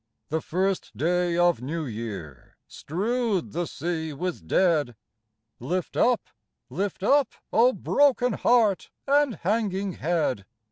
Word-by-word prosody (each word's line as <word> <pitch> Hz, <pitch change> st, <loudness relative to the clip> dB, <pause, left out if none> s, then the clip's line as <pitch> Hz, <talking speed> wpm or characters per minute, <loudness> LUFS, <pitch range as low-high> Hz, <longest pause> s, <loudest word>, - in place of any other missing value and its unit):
The 160 Hz, +1 st, -1 dB
first 190 Hz, +2 st, -2 dB
day 175 Hz, +1 st, +1 dB
of 175 Hz, -6 st, +3 dB
New 155 Hz, +5 st, -3 dB
Year 105 Hz, -, -7 dB
strewed 210 Hz, -, -2 dB
the 170 Hz, +1 st, -2 dB
sea 160 Hz, 0 st, -3 dB
with 160 Hz, -, -4 dB
dead. 150 Hz, -, +2 dB, 0.6 s
Lift 175 Hz, +8 st, -3 dB
up, 245 Hz, -1 st, +3 dB, 0.5 s
lift 190 Hz, +6 st, -3 dB
up, 280 Hz, +5 st, +3 dB, 0.2 s
O 240 Hz, +3 st, +5 dB
broken 260 Hz, -3 st, +2 dB
heart 220 Hz, -6 st, +2 dB, 0.2 s
and 280 Hz, -3 st, +3 dB
hanging 200 Hz, -1 st, -1 dB
head 150 Hz, -, -1 dB
180 Hz, 120 wpm, -26 LUFS, 155-215 Hz, 0.6 s, O